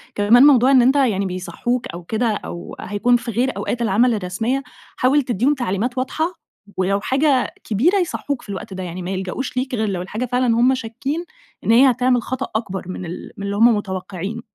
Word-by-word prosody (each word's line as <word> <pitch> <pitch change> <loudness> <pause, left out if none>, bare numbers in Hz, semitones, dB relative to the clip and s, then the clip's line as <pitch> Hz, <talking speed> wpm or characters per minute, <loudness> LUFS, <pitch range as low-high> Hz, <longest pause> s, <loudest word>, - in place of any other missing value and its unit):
كمان 220 +5 +5
موضوع 270 -2 +6
إن 260 - +7
أنتَ 260 +4 +4
يعني 220 -8 +2
بيصحوك 190 +7 -3
أو 170 +1 -8
كده 220 +7 -1
أو 190 -5 -5
هيكون 205 +5 +1
في 240 0 -6
غير 250 +4 0
أوقات 240 - -3
العمل 235 +3 +3
الرسميّة، 220 +7 -2 0.3
حاول 275 +4 +3
تديهم 250 +3 +1
تعليمات 245 -1 -2
واضحة، 315 +7 -1 0.4
ولو 195 +2 +1
حاجة 270 +1 +1
كبيرة 265 - +2
يصحوك 285 -6 -2
في - - -16
الوقت 190 0 -6
ده، 185 0 -5
يعني 180 +1 -6
ما 180 +2 -4
يلجأوش 190 +8 -4
ليك 255 0 -1
غير 220 -2 0
لو 185 -3 -2
الحاجة 210 +7 -4
فعلًا 250 +1 0
همّ 255 +2 +5
شاكين 265 +7 -4 0.4
إن - - +2
هيّ 260 +4 +7
هتعمل 250 0 +2
خطأ 260 +1 -4
أكبر 195 -4 -3
مِن 185 0 -5
ال 175 +2 -7
مِن 200 - -5
اللي 200 - -2
همّ 230 +3 +7
متوقعينه. 195 +2 -5
235 Hz, 195 wpm, -20 LUFS, 195-255 Hz, 0.4 s, إن